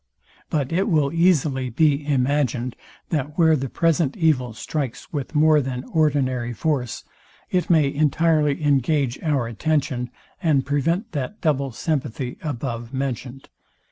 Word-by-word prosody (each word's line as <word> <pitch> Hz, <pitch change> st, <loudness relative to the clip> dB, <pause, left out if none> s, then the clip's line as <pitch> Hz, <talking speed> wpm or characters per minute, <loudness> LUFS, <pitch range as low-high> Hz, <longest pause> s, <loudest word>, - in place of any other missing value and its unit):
But 140 Hz, -4 st, -1 dB
it 190 Hz, +5 st, +1 dB
will 150 Hz, -4 st, +2 dB
easily 150 Hz, -7 st, +2 dB
be 145 Hz, +3 st, +2 dB
imagined, 130 Hz, -3 st, 0 dB, 0.3 s
that 150 Hz, -1 st, -2 dB
where 160 Hz, -2 st, +5 dB
the 135 Hz, -2 st, -3 dB
present 165 Hz, -2 st, +1 dB
evil 145 Hz, -8 st, +2 dB
strikes 135 Hz, +4 st, -5 dB
with 145 Hz, +1 st, -4 dB
more 155 Hz, 0 st, +5 dB
than 125 Hz, -1 st, -4 dB
ordinary 130 Hz, -6 st, +1 dB
force, 125 Hz, -2 st, -2 dB, 0.5 s
it 180 Hz, -1 st, 0 dB
may 155 Hz, -5 st, +4 dB
entirely 150 Hz, 0 st, +2 dB
engage 140 Hz, -2 st, +1 dB
our 145 Hz, -6 st, 0 dB
attention, 130 Hz, +1 st, -1 dB, 0.3 s
and 150 Hz, -5 st, +2 dB
prevent 165 Hz, -, 0 dB
that 145 Hz, +8 st, -4 dB
double 140 Hz, -4 st, 0 dB
sympathy, 130 Hz, -2 st, -3 dB
above 120 Hz, -4 st, -4 dB
mentioned. 135 Hz, 0 st, -4 dB
145 Hz, 130 wpm, -23 LUFS, 130-155 Hz, 0.5 s, where